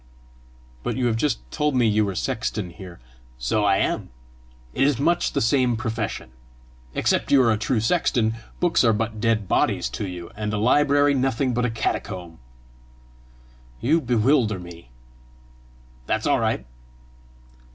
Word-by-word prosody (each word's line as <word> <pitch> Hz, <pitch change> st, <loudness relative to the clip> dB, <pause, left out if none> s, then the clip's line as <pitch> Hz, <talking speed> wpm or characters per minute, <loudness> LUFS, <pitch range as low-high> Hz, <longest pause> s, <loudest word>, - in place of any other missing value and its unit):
"But -, -, -3 dB
you 130 Hz, -, 0 dB
have 115 Hz, -2 st, +1 dB
just 125 Hz, 0 st, 0 dB
told 150 Hz, -2 st, 0 dB
me 125 Hz, -2 st, +3 dB
you 110 Hz, 0 st, +3 dB
were 100 Hz, -2 st, -3 dB
sexton 105 Hz, -2 st, -2 dB
here!" 90 Hz, 0 st, -11 dB, 0.4 s
"So 70 Hz, -, 0 dB
I 100 Hz, -1 st, +4 dB
am. -, -, -1 dB, 0.6 s
It 135 Hz, -, +3 dB
is 145 Hz, -4 st, 0 dB
much 170 Hz, +5 st, +1 dB
the -, -, 0 dB
same 120 Hz, 0 st, +2 dB
profession. 110 Hz, -, -4 dB, 0.6 s
Except -, -, +1 dB
you 140 Hz, -, +6 dB
are 115 Hz, -, +3 dB
a 110 Hz, -, +1 dB
true 115 Hz, +1 st, 0 dB
sexton, 115 Hz, -3 st, +1 dB, 0.3 s
books 175 Hz, -5 st, +3 dB
are 115 Hz, -2 st, +4 dB
but 110 Hz, 0 st, -3 dB
dead 110 Hz, -3 st, +1 dB
bodies -, -, +1 dB
to 100 Hz, -, -4 dB
you, 90 Hz, -2 st, -8 dB
and 105 Hz, 0 st, -3 dB
a -, -, -1 dB
library 145 Hz, +5 st, +3 dB
nothing 130 Hz, -1 st, 0 dB
but 125 Hz, +1 st, 0 dB
a -, -, +1 dB
catacomb!" 90 Hz, -6 st, -4 dB, 1.4 s
"You 155 Hz, +7 st, +2 dB
bewilder 120 Hz, -3 st, +2 dB
me!" 85 Hz, -6 st, -11 dB, 1.2 s
"That's -, -, -1 dB
all -, -, +3 dB
right!" -, -, -1 dB
115 Hz, 150 wpm, -23 LUFS, 105-130 Hz, 1.4 s, you